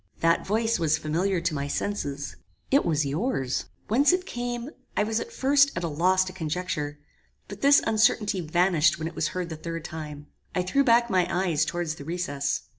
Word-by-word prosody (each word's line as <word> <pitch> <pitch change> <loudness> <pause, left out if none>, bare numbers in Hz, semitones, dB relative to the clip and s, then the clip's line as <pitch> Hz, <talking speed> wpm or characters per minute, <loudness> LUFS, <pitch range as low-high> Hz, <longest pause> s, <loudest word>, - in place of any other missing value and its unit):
That 165 +2 +2
voice 225 +1 +1
was 160 -2 +2
familiar 175 +5 0
to 170 -1 -1
my 140 -1 -2
senses. 145 -5 -3 0.4
It 280 +2 +5
was 155 -3 +1
yours. 140 - -1 0.2
"Whence 270 - +4
it 365 0 0
came, 245 -1 -4 0.3
I - - +4
was 220 +1 0
at - - -6
first 280 +1 +4
at 170 - -3
a - - 0
loss 180 +5 +2
to 185 0 -7
conjecture; 155 -3 -3 0.5
but - - -9
this 280 +1 +6
uncertainty 215 -3 +2
vanished 170 -1 +2
when 160 0 -3
it 165 - -7
was - - 0
heard 180 -1 -2
the 160 - -5
third 165 0 -6
time. 150 -2 -7 0.3
I 180 - +1
threw 275 +10 +2
back 235 -2 +4
my 180 -2 +3
eyes 170 -4 +1
towards 170 -2 -2
the 150 - -10
recess. 145 -4 -2
175 Hz, 190 wpm, -26 LUFS, 155-220 Hz, 0.5 s, this